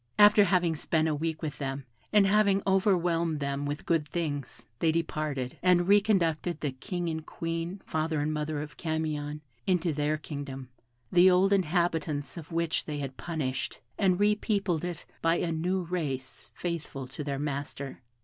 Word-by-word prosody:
After 205 Hz, 0 st, +8 dB
having 175 Hz, -3 st, +2 dB
spent 160 Hz, +1 st, +1 dB
a 155 Hz, -, +1 dB
week 160 Hz, +2 st, -2 dB
with 150 Hz, -2 st, -4 dB
them, 135 Hz, -1 st, -3 dB, 0.3 s
and 210 Hz, -2 st, +6 dB
having 200 Hz, -1 st, +4 dB
overwhelmed 175 Hz, -5 st, +2 dB
them 140 Hz, 0 st, -2 dB
with 145 Hz, +1 st, -4 dB
good 165 Hz, -3 st, +1 dB
things, 145 Hz, -5 st, -3 dB
they 165 Hz, -, +3 dB
departed, 155 Hz, -5 st, -2 dB
and 180 Hz, -1 st, +5 dB
reconducted 180 Hz, -5 st, +3 dB
the 150 Hz, -4 st, -1 dB
King 175 Hz, +7 st, -4 dB
and 160 Hz, -1 st, -2 dB
Queen, 165 Hz, +4 st, -4 dB
father 155 Hz, -1 st, -1 dB
and 150 Hz, +1 st, 0 dB
mother 150 Hz, -1 st, -2 dB
of 150 Hz, -, -11 dB
Camion, 155 Hz, -2 st, -2 dB, 0.3 s
into 180 Hz, -3 st, +2 dB
their 150 Hz, +1 st, 0 dB
kingdom, 140 Hz, -4 st, -6 dB, 0.4 s
the 180 Hz, +1 st, +7 dB
old 190 Hz, +2 st, +4 dB
inhabitants 165 Hz, -5 st, 0 dB
of 165 Hz, -2 st, -9 dB
which 165 Hz, -1 st, 0 dB
they 150 Hz, -1 st, -4 dB
had 135 Hz, -2 st, -4 dB
punished, 140 Hz, -6 st, -3 dB, 0.2 s
and 185 Hz, -2 st, +2 dB
repeopled 205 Hz, -4 st, +1 dB
it 175 Hz, -3 st, -4 dB, 0.2 s
by 165 Hz, 0 st, +3 dB
a 170 Hz, -1 st, 0 dB
new 180 Hz, +4 st, 0 dB
race 145 Hz, -7 st, -4 dB
faithful 165 Hz, -6 st, -4 dB
to 140 Hz, +3 st, -6 dB
their 140 Hz, -1 st, -2 dB
master. 140 Hz, -1 st, -4 dB
160 Hz, 160 wpm, -29 LUFS, 145-180 Hz, 0.4 s, After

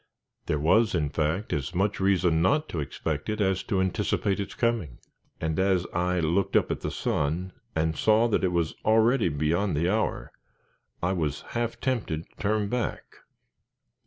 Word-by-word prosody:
There 75 Hz, -, +1 dB
was, 105 Hz, +8 st, +3 dB
in 75 Hz, -4 st, 0 dB
fact; 80 Hz, +7 st, -1 dB
as 75 Hz, +4 st, -3 dB
much 100 Hz, +3 st, 0 dB
reason 90 Hz, -4 st, +2 dB
not 150 Hz, -, +2 dB
to 85 Hz, -, -3 dB
expect 75 Hz, +3 st, -3 dB
it 110 Hz, -, -2 dB
as 95 Hz, -2 st, +1 dB
to 100 Hz, -5 st, 0 dB
anticipate 95 Hz, +1 st, 0 dB
its 100 Hz, -, -4 dB
coming, 115 Hz, -, -1 dB, 0.4 s
and 80 Hz, +1 st, -1 dB
as 95 Hz, -2 st, +2 dB
I 90 Hz, +1 st, +1 dB
looked 85 Hz, +4 st, 0 dB
up -, -, +3 dB
at -, -, -3 dB
the -, -, -2 dB
sun 80 Hz, +6 st, -1 dB, 0.2 s
and 80 Hz, 0 st, +1 dB
saw 110 Hz, +2 st, +4 dB
that 105 Hz, -, +1 dB
it 90 Hz, -, +2 dB
was 85 Hz, -2 st, 0 dB
already 110 Hz, -1 st, +4 dB
beyond 80 Hz, +4 st, 0 dB
the 85 Hz, +4 st, +1 dB
hour, 110 Hz, 0 st, -1 dB, 0.7 s
I 90 Hz, -, +2 dB
was 75 Hz, -6 st, -2 dB
half 120 Hz, -1 st, -2 dB
tempted 105 Hz, -12 st, -1 dB
to -, -, -31 dB
turn 105 Hz, 0 st, 0 dB
back. 120 Hz, +2 st, -3 dB
95 Hz, 170 wpm, -27 LUFS, 80-105 Hz, 0.7 s, saw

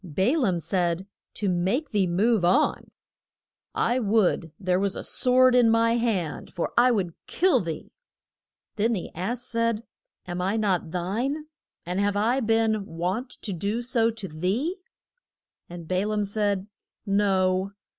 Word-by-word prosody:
Ba 190 Hz, -, +1 dB
laam 215 Hz, -, +1 dB
said, 175 Hz, +1 st, -1 dB, 0.3 s
To 205 Hz, -, -2 dB
make 190 Hz, -, 0 dB
thee 200 Hz, -4 st, +2 dB
move 205 Hz, +4 st, +2 dB
on: 175 Hz, +2 st, +2 dB, 0.9 s
I 245 Hz, +2 st, +1 dB
would 200 Hz, -7 st, +1 dB
there 185 Hz, -2 st, +1 dB
were 200 Hz, -, +2 dB
a 195 Hz, -, -4 dB
sword 255 Hz, 0 st, +3 dB
in 245 Hz, -2 st, +5 dB
my 230 Hz, 0 st, +3 dB
hand, 205 Hz, -10 st, -2 dB
for 175 Hz, -, -3 dB
I 245 Hz, +1 st, +6 dB
would 190 Hz, -8 st, 0 dB
kill 355 Hz, -8 st, +3 dB
thee. 165 Hz, -5 st, -5 dB, 0.9 s
Then 225 Hz, +3 st, +2 dB
the 190 Hz, -, -4 dB
ass 230 Hz, +8 st, -3 dB
said, 230 Hz, -2 st, -1 dB, 0.4 s
Am 175 Hz, 0 st, -4 dB
I 195 Hz, +4 st, 0 dB
not 190 Hz, -6 st, 0 dB
thine? 230 Hz, -, -2 dB, 0.4 s
and 180 Hz, +2 st, -2 dB
have 205 Hz, 0 st, +1 dB
I 235 Hz, +6 st, +2 dB
been 225 Hz, -2 st, +1 dB
wont 185 Hz, +10 st, -3 dB
to 205 Hz, -, -3 dB
do 205 Hz, +7 st, -2 dB
so 235 Hz, -2 st, +2 dB
to 220 Hz, -4 st, -6 dB
thee? 195 Hz, -, -1 dB, 0.9 s
And 170 Hz, -2 st, -9 dB
Ba 185 Hz, +3 st, 0 dB
laam 210 Hz, -1 st, 0 dB
said, 205 Hz, -1 st, -1 dB, 0.4 s
No. 195 Hz, -1 st, +1 dB
205 Hz, 150 wpm, -26 LUFS, 185-230 Hz, 0.9 s, I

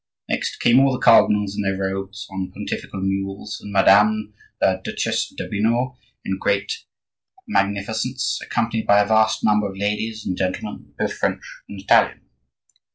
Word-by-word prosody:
Next -, -, -2 dB
came 120 Hz, +2 st, +5 dB
all 135 Hz, 0 st, +4 dB
the -, -, -1 dB
cardinals 105 Hz, -4 st, +4 dB
in -, -, -2 dB
their 95 Hz, -1 st, -1 dB
robes, 95 Hz, +2 st, -4 dB
on 95 Hz, -1 st, -4 dB
pontifical 95 Hz, -, -5 dB
mules, 95 Hz, +2 st, -3 dB
and 105 Hz, -, -9 dB
Madame 105 Hz, +2 st, +4 dB, 0.3 s
la 95 Hz, -, +2 dB
Duchesse 95 Hz, -, -2 dB
d'Urbino 120 Hz, +5 st, -1 dB, 0.3 s
in 95 Hz, 0 st, -2 dB
great 100 Hz, 0 st, -1 dB, 0.6 s
magnificence, 110 Hz, +6 st, -1 dB
accompanied 115 Hz, -1 st, -2 dB
by 100 Hz, -, +6 dB
a -, -, +2 dB
vast 110 Hz, 0 st, +2 dB
number 105 Hz, -1 st, +2 dB
of 95 Hz, -, -10 dB
ladies 105 Hz, +2 st, -2 dB
and 90 Hz, -, -1 dB
gentlemen, 95 Hz, 0 st, -4 dB
both -, -, -1 dB
French -, -, -2 dB, 0.3 s
and 100 Hz, -, -8 dB
Italian. 95 Hz, -, +3 dB
100 Hz, 150 wpm, -22 LUFS, 95-110 Hz, 0.6 s, by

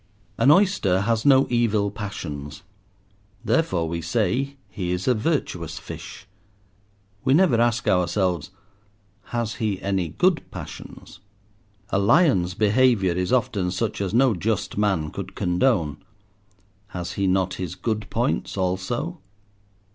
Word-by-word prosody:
An -, -, +5 dB
oyster 150 Hz, -, +4 dB
has 115 Hz, +4 st, 0 dB
no 135 Hz, -1 st, +6 dB
evil 110 Hz, -4 st, +1 dB
passions, 75 Hz, -9 st, -6 dB, 0.8 s
therefore 95 Hz, -, +1 dB
we 85 Hz, +1 st, -3 dB
say 115 Hz, -, 0 dB
he 90 Hz, -2 st, -4 dB
is 90 Hz, +1 st, -2 dB
a 130 Hz, -, +5 dB
virtuous 110 Hz, -, -2 dB
fish. 95 Hz, -, -9 dB, 1.0 s
We 130 Hz, -, +4 dB
never 155 Hz, -10 st, +4 dB
ask 120 Hz, 0 st, +1 dB
ourselves—"Has 100 Hz, +5 st, -3 dB
he 105 Hz, -4 st, 0 dB
any 95 Hz, -3 st, -1 dB
good 180 Hz, -, +2 dB
passions?" -, -, -10 dB, 0.7 s
A 100 Hz, -, +2 dB
lion's 100 Hz, -, +3 dB
behaviour 105 Hz, -3 st, +3 dB
is 90 Hz, +1 st, -2 dB
often 105 Hz, -7 st, +1 dB
such 100 Hz, +3 st, -2 dB
as 95 Hz, -2 st, -1 dB
no 125 Hz, +2 st, +4 dB
just 105 Hz, +3 st, -2 dB
man 95 Hz, -7 st, 0 dB
could 95 Hz, -1 st, -7 dB
condone. 90 Hz, -, +1 dB, 0.9 s
Has 90 Hz, -4 st, -5 dB
he 100 Hz, -1 st, 0 dB
not 95 Hz, 0 st, +1 dB
his 90 Hz, -1 st, -4 dB
good 110 Hz, +2 st, -3 dB
points -, -, -1 dB
also? 95 Hz, -, -2 dB
100 Hz, 125 wpm, -24 LUFS, 90-120 Hz, 1.0 s, no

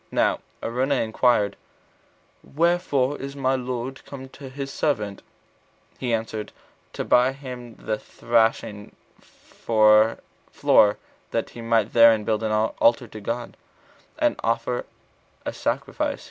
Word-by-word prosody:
Now -, -, +1 dB, 0.2 s
Araunah 130 Hz, +4 st, 0 dB
inquired, 110 Hz, -2 st, +2 dB, 0.9 s
"Wherefore 150 Hz, -4 st, +1 dB
is 140 Hz, +1 st, -6 dB
my 135 Hz, -1 st, +1 dB
lord 125 Hz, 0 st, -4 dB
come 130 Hz, -1 st, -9 dB
to 135 Hz, 0 st, -10 dB
his 135 Hz, +1 st, -6 dB
servant?" 105 Hz, -9 st, -1 dB, 0.8 s
He 125 Hz, -2 st, -2 dB
answered, 110 Hz, -1 st, -2 dB, 0.4 s
to -, -, -4 dB
buy 125 Hz, +1 st, +5 dB
of 135 Hz, -, -6 dB
him 125 Hz, -4 st, -9 dB
the 110 Hz, -1 st, -3 dB
thrashing 115 Hz, -2 st, 0 dB, 0.7 s
floor, 110 Hz, -1 st, +3 dB, 0.3 s
that -, -, -2 dB
he 120 Hz, -, -9 dB
might 115 Hz, -2 st, +1 dB
therein 115 Hz, -2 st, +6 dB
build 110 Hz, 0 st, 0 dB
an 110 Hz, -1 st, -1 dB
altar 115 Hz, +2 st, +2 dB
to 110 Hz, -, -9 dB
God, 120 Hz, +3 st, -4 dB, 0.6 s
and -, -, +1 dB
offer 115 Hz, +2 st, -1 dB, 0.6 s
a -, -, -3 dB
sacrifice. -, -, -2 dB
115 Hz, 120 wpm, -24 LUFS, 110-130 Hz, 0.9 s, therein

